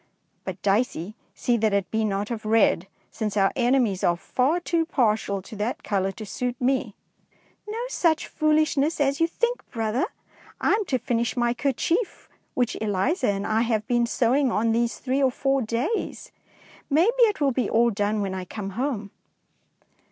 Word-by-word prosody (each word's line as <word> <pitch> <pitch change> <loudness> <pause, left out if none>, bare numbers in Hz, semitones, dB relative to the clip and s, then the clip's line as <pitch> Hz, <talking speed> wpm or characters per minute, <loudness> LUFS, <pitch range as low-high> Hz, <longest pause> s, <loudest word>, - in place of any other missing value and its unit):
But, 190 -1 -5
Dicey, 205 -2 0 0.2
see 240 -1 +1
that 215 -2 +1
it 200 -1 0
be 220 0 +1
not 205 +1 -1
of 225 -2 -4
red, 215 -4 +3 0.2
since 210 -2 -3
our 195 -1 +4
enemies 245 -6 +2
are 175 -1 +3
far 255 - +1
too 335 -1 0
partial 215 - 0
to 215 - -10
that 215 +4 -2
colour 195 -2 0
to 220 0 -8
suit 245 +4 -3
me.^^ 250 -4 0 0.8
'^No 470 +3 -3
such 325 -7 +2
foolishness 310 0 +1
as 280 -1 +1
you 330 - +5
think, 475 +8 -1
brother! 225 +2 -1 0.5
I - - +2
am 420 0 +2
to 265 - 0
finish 235 0 -1
my 240 -1 +2
kerchief 315 - -1 0.3
which 245 -2 0
Eliza 220 - +1
and 200 0 -1
I 220 +1 +1
have 225 -2 0
been 240 0 +1
sewing 255 +3 +2
on 225 +1 +1
these 235 +1 0
three 265 +1 -1
or 265 - +4
four 270 +2 0
days. 240 - -2 0.6
Maybe 380 - +3
it 420 -2 -1
will 280 -2 +3
be 245 -3 -1
all 235 +1 +3
done 205 0 0
when 195 -2 -2
I 185 -1 -4
come 195 +2 -6
home. 225 -3 -3
235 Hz, 175 wpm, -25 LUFS, 210-275 Hz, 0.8 s, you